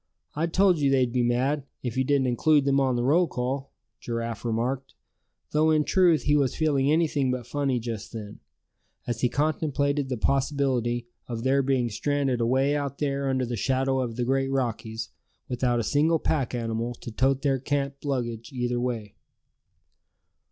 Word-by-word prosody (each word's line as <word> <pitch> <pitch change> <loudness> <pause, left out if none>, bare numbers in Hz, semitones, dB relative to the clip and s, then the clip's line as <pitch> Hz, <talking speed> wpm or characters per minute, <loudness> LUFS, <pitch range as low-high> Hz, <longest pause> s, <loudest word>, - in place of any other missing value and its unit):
I 160 +3 0
told 185 0 +3
you 140 -2 +3
they'd 130 -3 +2
be 125 - +2
mad, 130 +4 +1 0.2
if 120 -3 -3
you 130 - +2
didn't 140 0 +2
include 140 +4 +3
them 140 0 +3
on 130 -2 +2
the 120 - 0
roll 165 +7 +4
call," 135 +2 -3 0.3
Giraffe 115 -2 -4
remarked; 125 +4 -2 0.6
though 155 +1 +3
in 155 -1 +3
truth, 175 -2 +3
he 145 - +3
was 140 -4 +2
feeling 145 -3 +2
anything 150 -4 +2
but 125 -1 -2
funny 140 -3 -1
just 115 -3 -5
then, 105 -3 -8 0.7
as 120 -1 -3
he 125 - +3
contemplated 145 -1 0
the 125 - -2
possibility 130 -3 0 0.2
of 115 -2 -4
their 135 +1 +3
being 130 -2 +1
stranded 135 +1 0
away 135 +5 +2
out 140 -1 -3
there 140 -2 -1
under 130 -1 0
the 120 0 -3
shadow 130 +3 +1
of 120 -3 -2
the 120 0 -1
great 135 +1 +1
Rockies, 115 -4 -2 0.4
without 125 -1 0
a - - 0
single 150 +8 +2
pack 145 -6 -1
animal 115 0 -2
to 120 - -9
"tote" 135 +4 +1
their 135 -2 +2
camp 140 +1 -2
luggage 120 -5 -3
either 125 -2 -1
way. 120 -4 -3
135 Hz, 175 wpm, -26 LUFS, 120-140 Hz, 0.7 s, roll